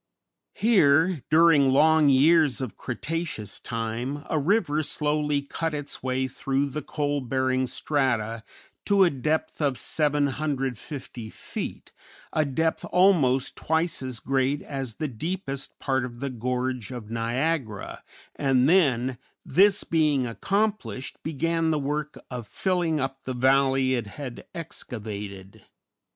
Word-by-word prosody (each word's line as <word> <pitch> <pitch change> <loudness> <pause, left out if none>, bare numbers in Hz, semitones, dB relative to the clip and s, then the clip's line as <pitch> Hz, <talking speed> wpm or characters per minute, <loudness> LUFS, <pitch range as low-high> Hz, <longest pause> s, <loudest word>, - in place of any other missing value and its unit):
Here, 165 - +4
during 155 -3 +6
long 155 +2 +5
years 150 +1 +5
of 130 -5 -4
Cretaceous 155 -3 -4
time, 120 +5 -4
a 155 - +2
river 155 -2 +2
slowly 150 -1 0
cut 160 +2 -3
its 145 -1 -5
way 130 0 0
through 135 +2 -1
the 150 - -3
coal 145 -2 -2
bearing 130 0 0
strata 120 -7 -1 0.4
to 200 -1 +5
a 175 - +4
depth 155 +4 -1
of 140 -4 +1
750 140 -4 -2
feet, - - -6 0.4
a 155 - +3
depth 160 +4 0
almost 160 -9 +3
twice 160 0 0
as 130 -3 -4
great 135 +3 0
as 135 -5 -5
the 155 - -2
deepest 140 - -4
part 130 -2 0
of 120 -1 -7
the 140 0 -3
gorge 125 0 -2
of 120 -4 -8
Niagara, 115 - -2 0.3
and 135 -2 +3
then, 130 -8 +3 0.3
this 200 +2 +4
being 150 -5 +2
accomplished, 195 - -2
began 165 +2 0
the 155 - +2
work 150 +1 -3
of 120 -4 -5
filling 175 -5 0
up 135 0 -3
the 130 - -5
valley 135 +1 +3
it 120 -4 -1
had 125 +2 -8
excavated. 105 - -7
140 Hz, 125 wpm, -26 LUFS, 130-155 Hz, 0.4 s, during